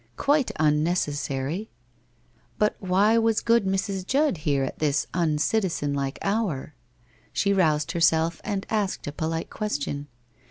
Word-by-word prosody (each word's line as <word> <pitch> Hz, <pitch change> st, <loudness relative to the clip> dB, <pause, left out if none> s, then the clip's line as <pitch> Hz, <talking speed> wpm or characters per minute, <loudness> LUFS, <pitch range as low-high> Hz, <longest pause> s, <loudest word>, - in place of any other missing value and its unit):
Quite 285 Hz, -2 st, +2 dB
unnecessary! 150 Hz, +1 st, 0 dB, 0.9 s
But 210 Hz, 0 st, +2 dB
why 200 Hz, +4 st, +3 dB
was 225 Hz, -1 st, +2 dB
good 230 Hz, -3 st, +3 dB
Mrs. 195 Hz, 0 st, -1 dB
Judd 275 Hz, -, +1 dB
here 145 Hz, -3 st, 0 dB
at 135 Hz, -, -5 dB
this 150 Hz, -1 st, +1 dB
uncitizen 165 Hz, -1 st, 0 dB
like 140 Hz, -1 st, -2 dB
hour? 195 Hz, -10 st, -1 dB, 0.6 s
She 200 Hz, 0 st, +1 dB
roused 155 Hz, -6 st, +2 dB
herself 165 Hz, 0 st, +2 dB
and 200 Hz, -2 st, -3 dB
asked 210 Hz, -3 st, -1 dB
a 145 Hz, -, -3 dB
polite 160 Hz, +2 st, -3 dB
question. 145 Hz, -8 st, -3 dB
175 Hz, 125 wpm, -25 LUFS, 150-210 Hz, 0.9 s, why